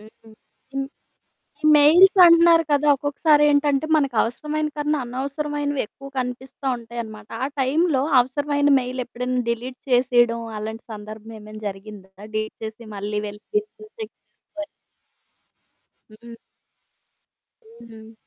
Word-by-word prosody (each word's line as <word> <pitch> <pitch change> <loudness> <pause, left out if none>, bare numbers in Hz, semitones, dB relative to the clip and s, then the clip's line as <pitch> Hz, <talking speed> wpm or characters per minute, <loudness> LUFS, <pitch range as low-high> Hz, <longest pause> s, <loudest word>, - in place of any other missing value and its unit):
హ్. 210 - -15 0.7
హ్మ్. 275 0 -2 0.8
ఈ - - -14
మెయిల్స్ 340 +7 +6
అంటున్నారు 335 -1 +6
కదా! 290 +1 +2
ఒక్కొక్కసారి 290 +2 +2
ఏంటంటే 285 0 +2
మనకవసరమైన 295 +3 -1
కన్నా 300 0 0
అనవసరమైనవి 285 +2 -3
ఎక్కువ 275 +5 -13
కనిపిస్తా 255 +2 -5
ఉంటాయనమాట. 225 -2 -8 0.2
ఆ - - 0
టైం‌లో 280 +1 +2 0.2
అవసరమైన 285 +3 0
మెయిల్ 255 0 -4
ఎప్పుడైనా 250 +1 -3
డిలీట్ 250 +2 -4
చేసేయడం 240 -2 +3 0.2
అలాంటి 220 +1 -6
సందర్భం 215 +1 -10
ఏమైనా 215 +1 -11
జరిగిందా? 195 0 -10 0.2
డిలీట్ 215 0 -3
చేసి 220 +2 -8
మళ్ళీ 210 +1 -3
వెళ్ళి 205 0 -9
ఫిజికల్ 425 0 -4
చెక్ 440 - -7 0.3
చేయాలి. 310 -1 -7 1.4
హ్మ్. 235 +2 -13 1.6
హ్మ్. 220 0 -13
255 Hz, 110 wpm, -22 LUFS, 225-295 Hz, 1.6 s, మెయిల్స్